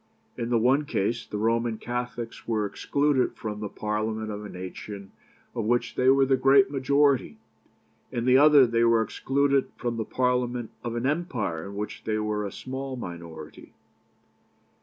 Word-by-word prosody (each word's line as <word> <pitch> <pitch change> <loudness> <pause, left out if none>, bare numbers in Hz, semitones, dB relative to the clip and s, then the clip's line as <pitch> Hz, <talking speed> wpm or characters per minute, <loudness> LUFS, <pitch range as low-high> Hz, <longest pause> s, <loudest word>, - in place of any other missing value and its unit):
In 120 -1 -3
the 120 - +3
one 130 +6 +3
case, 115 -1 -1
the 105 - -4
Roman 115 +1 0
Catholics 120 0 -5
were 110 -2 0
excluded 140 +5 0
from 105 -2 -5
the 105 -1 -4
Parliament 110 +1 -3
of 105 0 -6
a 105 - -7
nation 95 +2 -8 0.4
of 115 - -3
which 120 +2 +1
they 130 0 +3
were 135 0 +5
the 135 0 +3
great 135 +1 +5
majority; 140 0 +2 0.7
in 120 0 -2
the 130 0 +5
other, 145 -1 +7
they 115 -1 +1
were 115 -1 +4
excluded 140 +3 +1
from 120 -1 -3
the 110 - -1
Parliament 125 -1 -1
of 120 -1 -3
an 120 +1 -2
empire 130 - -2
in 100 - -8
which 105 +1 -5
they 110 -1 -1
were 105 -1 -1
a - - -7
small 130 +1 -5
minority. 85 -7 -9
120 Hz, 165 wpm, -26 LUFS, 105-130 Hz, 0.7 s, other